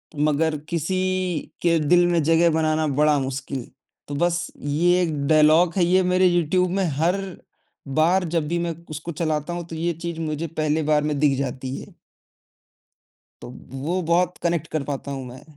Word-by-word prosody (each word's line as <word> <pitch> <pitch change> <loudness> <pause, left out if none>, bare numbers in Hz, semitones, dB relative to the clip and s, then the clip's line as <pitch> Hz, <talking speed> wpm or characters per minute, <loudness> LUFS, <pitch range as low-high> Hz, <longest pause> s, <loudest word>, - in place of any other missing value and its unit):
मगर 155 +1 +1
किसी 170 +2 -1 0.6
के 170 -1 +3
दिल 175 +4 +4
में 170 -2 +2
जगह 165 +2 +4
बनाना 155 0 +1
बड़ा 150 -1 +4
मुश्किल, 135 -1 -4 0.4
तो 145 - -5
बस 175 +3 0
ये 175 +5 +2
एक 160 -3 -1
डायलॉग 155 +2 +5
है, 180 - +4
ये 185 +2 +3
मेरे 185 +1 +3
यूट्यूब 175 +1 +2
में 195 - +2 0.2
हर 180 +4 +1 0.8
बार 180 +4 +3
जब 155 -2 0
भी 170 +1 -1
मैं 170 -1 -2
उसको 155 +3 -6
चलाता 155 +1 -2
हूँ, 175 -1 -5
तो 165 - -7
ये 170 +2 -1
चीज़ 170 -1 -4
मुझे 155 +1 -3
पहले 155 0 -1
बार 150 -1 +3
में 150 -1 -1
दिख 145 -3 +3
जाती 130 0 -4
है। - - -12 1.5
तो - - -8 0.2
वो 160 +8 -2
बहुत 180 +1 +2
कनेक्ट 170 -2 0
कर 155 - -1
पाता 140 0 -5
हूँ 135 -1 -5
मैं, 125 +1 -11
160 Hz, 175 wpm, -23 LUFS, 150-175 Hz, 1.5 s, डायलॉग